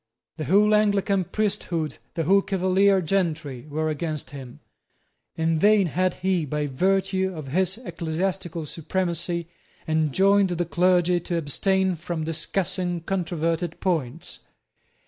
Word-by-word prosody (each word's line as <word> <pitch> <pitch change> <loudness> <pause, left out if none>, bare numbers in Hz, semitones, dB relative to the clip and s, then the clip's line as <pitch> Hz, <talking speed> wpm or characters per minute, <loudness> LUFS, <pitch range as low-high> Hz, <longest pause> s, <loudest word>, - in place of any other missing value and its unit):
The 155 - -3
whole 210 +4 +4
Anglican 200 -2 +2
priesthood, 185 -7 -2 0.2
the 165 - 0
whole 195 +5 +4
Cavalier 190 0 +2
gentry, 160 -7 -2
were 155 +2 -1
against 155 -1 -4
him. 130 -4 -9 0.8
In 160 0 +1
vain 205 +1 +5
had 185 +2 0
he, 185 -2 0
by 150 +1 -2
virtue 190 +6 +1
of 150 -4 -7
his 185 +6 +1
ecclesiastical 175 -3 -3
supremacy, 170 +1 -2 0.4
enjoined 190 +6 +3
the 175 0 -1
clergy 180 0 +3
to 170 0 -3
abstain 190 +5 +1
from 170 -1 -4
discussing 175 +2 -2
controverted 170 -2 -2
points. 160 -10 -2
175 Hz, 120 wpm, -24 LUFS, 160-190 Hz, 0.8 s, vain